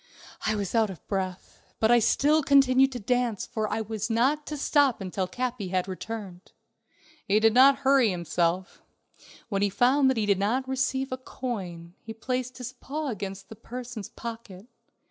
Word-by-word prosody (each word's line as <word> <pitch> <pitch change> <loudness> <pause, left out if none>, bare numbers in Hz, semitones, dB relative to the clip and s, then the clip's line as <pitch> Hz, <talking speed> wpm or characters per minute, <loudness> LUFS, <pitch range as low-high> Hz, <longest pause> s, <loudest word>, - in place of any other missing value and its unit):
I 215 - +1
was 200 -3 -3
out 225 -2 +3
of 185 -5 -11
breath, 190 -2 -4 0.2
but 220 +1 +3
I 240 - +6
still 295 +7 +3
continued 270 -1 +4
to 245 - -4
dance, 240 -1 0
for 220 -3 -3
I 220 - -1
was 220 0 -4
not 265 +7 +1
to 300 - -4
stop 285 -3 +2
until 190 -1 -3
Capi 245 0 -3
had 185 0 -1
returned. 190 -1 -7 0.7
He 205 +2 +4
did 225 0 +4
not 270 +3 +7
hurry 265 -4 +5
himself; 175 +1 -1 0.7
when 200 -3 -1
he 205 - +3
found 265 +6 +3
that 260 - 0
he 215 - +1
did 200 -2 +2
not 245 +7 0
receive 265 0 -1
a 255 - -2
coin, 185 -10 -6
he 225 0 -9
placed 255 +2 -3
his 250 0 -6
paw 290 +3 -5
against 195 -3 -6
the 220 - -9
person's 240 -2 -8
pocket. 225 -4 -8
225 Hz, 175 wpm, -27 LUFS, 195-255 Hz, 0.7 s, not